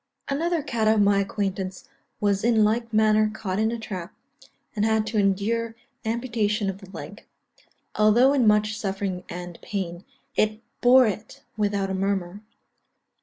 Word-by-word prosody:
_) 275 Hz, -, 0 dB
Another 335 Hz, +1 st, 0 dB
cat 230 Hz, -6 st, -1 dB
of 220 Hz, 0 st, +4 dB
my 200 Hz, 0 st, +4 dB
acquaintance 195 Hz, -2 st, -3 dB, 0.3 s
was 200 Hz, -1 st, +1 dB
in 225 Hz, -2 st, +4 dB
like 230 Hz, +2 st, +1 dB
manner 215 Hz, 0 st, +4 dB
caught 200 Hz, -3 st, -3 dB
in 220 Hz, +1 st, +2 dB
a 235 Hz, -, -3 dB
trap, 190 Hz, -5 st, -6 dB, 0.6 s
and 210 Hz, -, 0 dB
had 220 Hz, 0 st, +2 dB
to 215 Hz, 0 st, -1 dB
endure 215 Hz, +4 st, 0 dB, 0.3 s
amputation 220 Hz, -3 st, 0 dB
of 190 Hz, -, -12 dB
the 195 Hz, -2 st, -13 dB
leg; -, -, -9 dB, 0.7 s
although 225 Hz, +6 st, +5 dB
in 255 Hz, -5 st, +3 dB
much 210 Hz, 0 st, +3 dB
suffering 195 Hz, -3 st, -3 dB
and 175 Hz, -1 st, -7 dB
pain, 180 Hz, -3 st, -4 dB, 0.3 s
it 215 Hz, 0 st, +1 dB, 0.2 s
bore 255 Hz, +1 st, +7 dB
it 215 Hz, 0 st, -5 dB
without 200 Hz, -2 st, 0 dB
a -, -, -1 dB
murmur. 195 Hz, 0 st, -2 dB
210 Hz, 155 wpm, -25 LUFS, 195-225 Hz, 0.7 s, bore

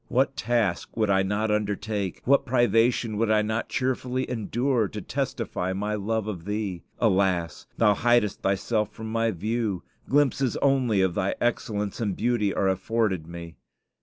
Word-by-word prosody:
"What 135 Hz, +2 st, +1 dB
task 115 Hz, -7 st, -1 dB
would 110 Hz, -3 st, +2 dB
I 95 Hz, 0 st, +4 dB
not 105 Hz, +3 st, 0 dB
undertake, 105 Hz, -2 st, -2 dB
what 140 Hz, +2 st, +4 dB
privation 120 Hz, -2 st, +2 dB
would 115 Hz, 0 st, +1 dB
I 110 Hz, -1 st, +4 dB
not 110 Hz, +2 st, -2 dB
cheerfully 130 Hz, 0 st, -1 dB
endure, 120 Hz, 0 st, 0 dB
to 85 Hz, -, -6 dB
testify 90 Hz, +1 st, -3 dB
my 105 Hz, +2 st, -2 dB
love 105 Hz, +1 st, -1 dB
of 95 Hz, -6 st, -5 dB
Thee? 105 Hz, -4 st, -3 dB, 0.2 s
Alas! 95 Hz, -6 st, +1 dB
Thou 105 Hz, -2 st, +5 dB
hidest 120 Hz, -1 st, +2 dB
Thyself 105 Hz, +3 st, 0 dB
from 110 Hz, 0 st, -7 dB
my 115 Hz, 0 st, +1 dB
view; 105 Hz, 0 st, -2 dB, 0.3 s
glimpses 135 Hz, -2 st, +2 dB
only 130 Hz, -7 st, +2 dB
of 95 Hz, -2 st, +1 dB
Thy 95 Hz, +3 st, -1 dB
excellence 105 Hz, -3 st, -1 dB
and 100 Hz, -5 st, -1 dB
beauty 115 Hz, -4 st, +1 dB
are 95 Hz, -, 0 dB
afforded 95 Hz, -2 st, 0 dB
me. 85 Hz, -1 st, -9 dB
110 Hz, 155 wpm, -26 LUFS, 100-120 Hz, 0.3 s, Thou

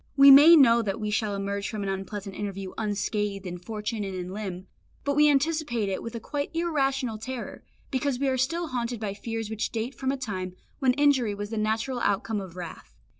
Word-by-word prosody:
We 275 Hz, 0 st, +10 dB
may 295 Hz, +5 st, +10 dB
know 235 Hz, -6 st, +6 dB
that 215 Hz, 0 st, -3 dB
we 210 Hz, -1 st, -2 dB
shall 210 Hz, -1 st, 0 dB
emerge 200 Hz, 0 st, -3 dB
from 215 Hz, -2 st, -4 dB
an 195 Hz, -, -2 dB
unpleasant 195 Hz, +1 st, -5 dB
interview 195 Hz, -2 st, -5 dB
unscathed 205 Hz, -1 st, -2 dB
in 180 Hz, -1 st, -5 dB
fortune 210 Hz, +3 st, -4 dB
and 195 Hz, -1 st, -4 dB
in 180 Hz, 0 st, -5 dB
limb, 190 Hz, -3 st, -5 dB, 0.4 s
but 285 Hz, 0 st, 0 dB
we 300 Hz, 0 st, +6 dB
anticipate 285 Hz, -7 st, +1 dB
it 190 Hz, -, -2 dB
with 230 Hz, 0 st, -6 dB
a -, -, -3 dB
quite 285 Hz, +4 st, -3 dB
irrational 270 Hz, -8 st, 0 dB
terror, 250 Hz, +2 st, -6 dB, 0.3 s
because 265 Hz, -1 st, 0 dB
we 275 Hz, +2 st, 0 dB
are 260 Hz, -, +2 dB
still 325 Hz, +6 st, -1 dB
haunted 240 Hz, -2 st, -2 dB
by 210 Hz, -3 st, -3 dB
fears 225 Hz, +1 st, -5 dB
which 220 Hz, -1 st, -2 dB
date 230 Hz, +3 st, -3 dB
from 265 Hz, -1 st, -2 dB
a 275 Hz, -, -2 dB
time 185 Hz, -7 st, -4 dB, 0.2 s
when 260 Hz, -3 st, +3 dB
injury 265 Hz, -6 st, +3 dB
was 205 Hz, +1 st, -6 dB
the 225 Hz, -, -3 dB
natural 220 Hz, +4 st, -1 dB
outcome 205 Hz, 0 st, 0 dB
of 185 Hz, -3 st, -9 dB
wrath. 175 Hz, -3 st, -9 dB
225 Hz, 210 wpm, -27 LUFS, 200-265 Hz, 0.4 s, We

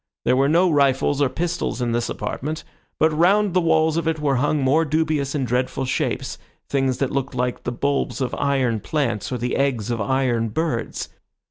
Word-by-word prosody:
There -, -, +4 dB
were 135 Hz, +2 st, +3 dB
no 175 Hz, +4 st, +4 dB
rifles 140 Hz, 0 st, +2 dB
or 140 Hz, -, +3 dB
pistols 175 Hz, +1 st, -2 dB
in 120 Hz, -1 st, 0 dB
this 120 Hz, 0 st, -1 dB
apartment, 155 Hz, +4 st, -4 dB, 0.3 s
but 160 Hz, 0 st, +3 dB
round 195 Hz, +4 st, +3 dB
the 180 Hz, -, +3 dB
walls 160 Hz, -1 st, +2 dB
of 165 Hz, -, -1 dB
it 160 Hz, -1 st, 0 dB
were 140 Hz, -3 st, +1 dB
hung 145 Hz, +4 st, +1 dB
more 145 Hz, +5 st, +3 dB
dubious 155 Hz, -2 st, 0 dB
and 135 Hz, -3 st, 0 dB
dreadful 130 Hz, +2 st, -1 dB
shapes, 130 Hz, -, -2 dB, 0.3 s
things 135 Hz, -2 st, 0 dB
that 135 Hz, -, -1 dB
looked 135 Hz, -1 st, -2 dB
like 125 Hz, 0 st, -2 dB
the 120 Hz, -, -1 dB
bulbs 140 Hz, +3 st, -1 dB
of 130 Hz, -2 st, -2 dB
iron 130 Hz, -5 st, +1 dB
plants, 135 Hz, -4 st, -2 dB
or 125 Hz, -, -1 dB
the 120 Hz, +1 st, -2 dB
eggs 125 Hz, -6 st, 0 dB
of 115 Hz, -2 st, -1 dB
iron 120 Hz, 0 st, +1 dB
birds. 140 Hz, -2 st, -2 dB
140 Hz, 195 wpm, -22 LUFS, 125-155 Hz, 0.3 s, There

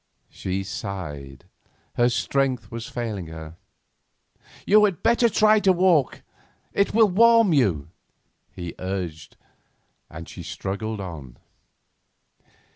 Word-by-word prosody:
She 95 Hz, +1 st, -4 dB
sighed; 80 Hz, -, -7 dB, 0.5 s
her 120 Hz, 0 st, +3 dB
strength 125 Hz, -1 st, -1 dB
was 115 Hz, 0 st, -6 dB
failing 110 Hz, -7 st, -4 dB
her. 80 Hz, 0 st, -9 dB, 1.1 s
"You 210 Hz, +2 st, +5 dB
had 195 Hz, -5 st, -2 dB
better 235 Hz, 0 st, +4 dB
try 215 Hz, 0 st, +4 dB
to 195 Hz, -2 st, +4 dB
walk, 175 Hz, -6 st, +2 dB, 0.5 s
it 200 Hz, -, +1 dB
will 225 Hz, -1 st, +6 dB
warm 230 Hz, 0 st, +5 dB
you," 95 Hz, -, +1 dB, 0.6 s
he 85 Hz, -2 st, -7 dB
urged, 90 Hz, -5 st, -5 dB, 0.7 s
and 80 Hz, +2 st, -9 dB
she -, -, -9 dB
struggled 100 Hz, +4 st, -5 dB
on. 75 Hz, -10 st, -8 dB
110 Hz, 110 wpm, -24 LUFS, -, 1.1 s, will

